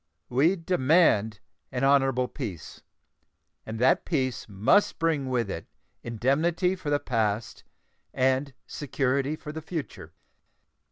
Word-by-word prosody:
We 145 +9 +3
demand 155 - +2 0.3
an 125 0 -2
honorable 135 -2 +3
peace, 105 - -7 0.9
and 110 +1 -5
that 130 +3 +3
peace 130 -9 -2
must 105 - +2
bring 155 -5 0
with 120 -4 0
it 90 -4 -6 0.3
indemnity 155 - 0
for 175 -5 -6
the 145 0 +2
past 110 -4 -2 0.5
and 130 +1 0
security 140 0 -1
for 150 - -8
the 160 +1 -6
future. 160 -1 -6
135 Hz, 115 wpm, -27 LUFS, 120-155 Hz, 0.9 s, We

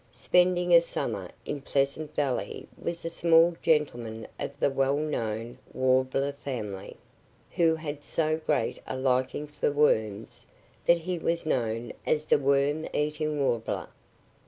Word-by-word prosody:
Spending 180 0 +2
a 170 - +9
summer 100 - -3 0.2
in 145 - -4
Pleasant 140 +2 -1
Valley 125 -9 -2
was 170 0 -5
a - - -1
small 165 0 +4
gentleman 120 -8 0
of 140 +1 -5
the 140 - +2
well 135 +1 +1
known 120 -5 -3
Warbler 130 +2 +2
family, 115 -9 -6 0.5
who 165 -2 +3
had 150 -2 -6
so 155 0 0
great 155 -2 0
a 130 - -3
liking 130 +2 0
for 150 0 -1
worms 110 -8 0 0.4
that 170 - +6
he 175 +1 -3
was 170 0 -1
known 115 -5 -1
as 155 0 +1
the - - +4
Worm 140 +3 +1
eating 150 0 -1
Warbler. 120 -5 -1
140 Hz, 135 wpm, -28 LUFS, 125-155 Hz, 0.5 s, a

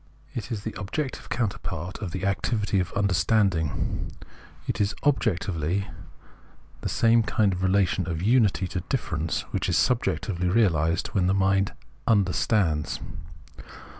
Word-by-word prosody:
It 120 -2 -5
is 105 -3 -3
the 110 - -4
objective 130 +8 -4
counterpart 95 -6 -3
of 105 -4 -4
the 95 +2 -4
activity 100 +1 0
of 90 0 -2
"understanding 95 -3 +1 0.3
"; - - -23
it - - -1
is 105 +2 +1
objectively 100 - 0 0.9
the - - -2
same 115 0 +4
kind 110 -3 +1
of 90 - -4
relation 95 -1 +2
of 80 -2 -2
unity 105 -2 +3
to 90 - -2
differences 85 - -1
which - - -1
is - - +2
subjectively 95 -7 +1
realised 85 -6 +2
when 90 -2 +1
the 95 - +2
mind 95 0 +2 0.3
"understands." 95 -6 +2
95 Hz, 135 wpm, -26 LUFS, 90-110 Hz, 0.9 s, same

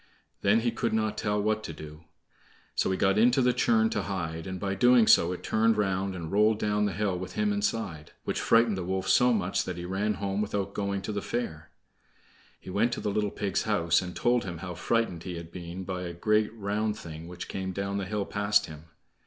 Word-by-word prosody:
Then 105 +3 +4
he 120 0 +1
could 115 -1 -1
not 110 -1 0
tell 105 0 0
what 110 +1 0
to 80 - -6
do. 75 +1 -11 0.7
So - - +1
he 95 - 0
got 95 +2 +3
into 120 +4 +5
the 125 -1 +3
churn 110 -2 +3
to 105 - 0
hide, 85 -4 -4
and 95 -1 -5
by 100 +1 -2
so - - -6
doing 120 +2 +6
it 90 -3 +4
turned 110 +1 +2
round, 95 -2 0
and 80 -3 -6
rolled 105 +2 +4
down 105 -1 +1
the 100 - 0
hill 95 0 -1
with 90 0 -6
him 105 -1 +1
inside, 100 -6 -2
which - - -2
frightened 115 -2 +4
the 95 - -3
wolf 95 +1 -2
so 125 +6 +5
much 95 -5 0
that 90 -1 -4
he 85 - -5
ran 100 +3 -1
home 100 +1 -2
without 100 -1 -2
going 100 -1 -2
to 105 - -3
the 100 -1 -2
fair. 80 -11 -4 0.9
He 95 - -9
went 115 +5 +2
to - - -3
the 105 - -2
little 105 0 0
pig's 100 -2 -1
house, 85 -6 +2
and 90 -1 -7
told 120 0 +2
him 90 -3 -5
how 90 +1 -6
frightened 90 -1 0
he 90 0 -6
had 85 0 -8
been 90 +1 -7
by 90 -1 -4
a 85 -1 -5
great 105 +5 +1
round 105 0 -1
thing 80 -2 -8
which 90 0 -7
came 95 -1 -4
down 100 +1 -2
the 100 - -3
hill 105 0 -2
past 100 0 +2
him. 75 0 -11
100 Hz, 225 wpm, -28 LUFS, 90-105 Hz, 0.9 s, doing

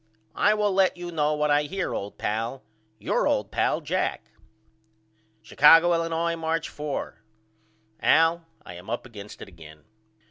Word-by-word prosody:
I 210 +1 +3
will 210 -2 0
let 190 -1 +2
you 175 0 -7
know 150 -2 0
what 150 0 0
I 145 0 +4
hear 195 +5 -3
old 100 +1 -6
pal. 115 +5 -3 0.3
Your - - 0
old - - -1
pal, - - 0
JACK. - - -3 1.1
Chicago, 165 +9 +6
Illinois, 165 0 -1
March 165 0 -2
4. 145 -7 -6 0.8
AL: 165 +1 +3 0.2
I 90 - -9
am 90 +2 -11
up 120 - -4
against 105 -4 -11
it - - -12
again. 75 -4 -15
150 Hz, 145 wpm, -25 LUFS, 110-170 Hz, 1.1 s, Chicago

